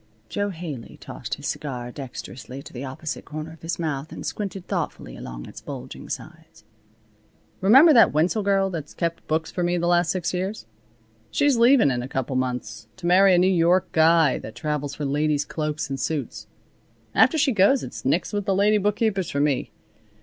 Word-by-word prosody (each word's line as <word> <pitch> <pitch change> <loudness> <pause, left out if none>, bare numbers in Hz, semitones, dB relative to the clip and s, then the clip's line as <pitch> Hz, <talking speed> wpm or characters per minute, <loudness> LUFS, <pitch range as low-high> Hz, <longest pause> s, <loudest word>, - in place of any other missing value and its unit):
Jo 205 - -1
Haley 160 - -7
tossed - - -6
his - - -11
cigar 125 -4 -4
dexterously 130 0 -8
to - - -12
the 125 +1 -6
opposite 140 +3 -5
corner 155 +1 -7
of 165 - -17
his 165 +1 -3
mouth 155 -3 -3
and - - -7
squinted 195 -3 -4
thoughtfully - - -4
along - - -8
its - - -11
bulging - - -8
sides. - - -9 1.0
"Remember 270 - +7
that 230 - +7
Wenzel 170 +8 +1
girl 195 -1 +2
that's 155 -4 -6
kept 170 -1 -3
books 160 +1 -1
for 180 - -3
me 175 0 +1
for 175 - -1
the 170 - 0
last 175 -1 +3
six 180 +1 -1
years? 190 - -3 0.6
She's 285 -2 +2
leaving 235 - +5
in 120 -1 -1
a 125 - -5
couple 130 0 -3
of 130 - +1
months 125 -4 -4
to - - -8
marry 185 +2 +6
a - - +3
New 180 - +4
York 180 0 +3
guy 160 -3 +4
that 110 - -9
travels 145 -2 -3
for 150 - -4
ladies' 145 +1 +1
cloaks 155 -1 -3
and 135 -1 -4
suits. 150 0 -3 0.7
After 325 - +4
she 290 -2 +3
goes 220 +5 +4
it's - - -7
nix 160 +10 0
with 205 -1 -1
the 195 -2 +1
lady 210 +2 +3
bookkeepers 205 -2 0
for 140 - -2
me. 145 -2 +1
165 Hz, 195 wpm, -24 LUFS, 140-195 Hz, 1.0 s, Remember